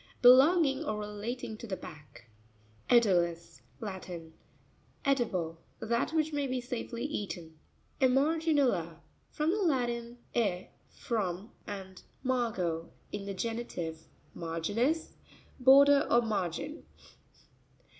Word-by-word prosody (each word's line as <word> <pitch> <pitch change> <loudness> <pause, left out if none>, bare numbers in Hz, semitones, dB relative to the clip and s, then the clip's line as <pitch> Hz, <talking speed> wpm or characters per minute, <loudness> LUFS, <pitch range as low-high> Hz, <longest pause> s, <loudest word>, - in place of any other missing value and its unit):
Belonging 270 +3 +6
or 215 - -2
relating 215 +2 -5
to 235 - -8
the 190 -3 -3
back. 145 -6 -12 0.6
E'puuis.—Latin. 180 -3 0 0.7
Edible; 185 - 0 0.2
that 235 +5 0
which 315 -1 0
may 285 -1 0
be 255 0 -1
safely 245 0 -4
eaten. 175 - -5 0.4
Emarei'nuta.—From 270 - +1
the 415 +3 0
Latin, 240 -7 0 0.2
e, 195 -6 0 0.2
from, 205 -1 -3 0.2
and 190 -2 -7 0.2
margo, 210 -11 -1 0.2
in 200 -1 -5
the 200 - -4
genitive, 185 -8 -4 0.3
marginis, 205 - -1 0.5
border 280 +2 +7
or 240 0 +4
margin. 210 - -3
230 Hz, 95 wpm, -31 LUFS, 180-265 Hz, 0.7 s, border